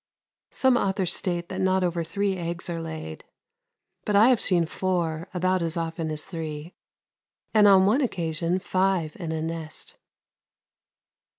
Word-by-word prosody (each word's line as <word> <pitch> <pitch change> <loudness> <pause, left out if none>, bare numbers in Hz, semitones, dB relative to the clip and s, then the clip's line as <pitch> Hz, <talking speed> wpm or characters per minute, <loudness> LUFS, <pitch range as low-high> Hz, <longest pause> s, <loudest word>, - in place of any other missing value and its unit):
Some 260 -2 +3
authors 190 -4 0
state 175 -2 -2
that 190 0 -4
not 190 0 +2
over 170 -1 0
three 200 +4 -1
eggs 170 0 -4
are 165 -1 -3
laid, 160 - -7 0.8
but 210 - -1
I 215 +5 +7
have 250 -4 +3
seen 175 -3 +3
four 170 -1 -2
about 185 0 0
as 165 0 -2
often 165 -1 -3
as 155 0 -3
three 160 -1 -6 0.8
and, 210 -2 +6
on 190 -1 +6
one 225 +9 +3
occasion, 170 - -1
five 185 -4 0
in 170 -4 -5
a 160 -1 -2
nest. 160 -1 -3
175 Hz, 150 wpm, -25 LUFS, 165-190 Hz, 0.8 s, I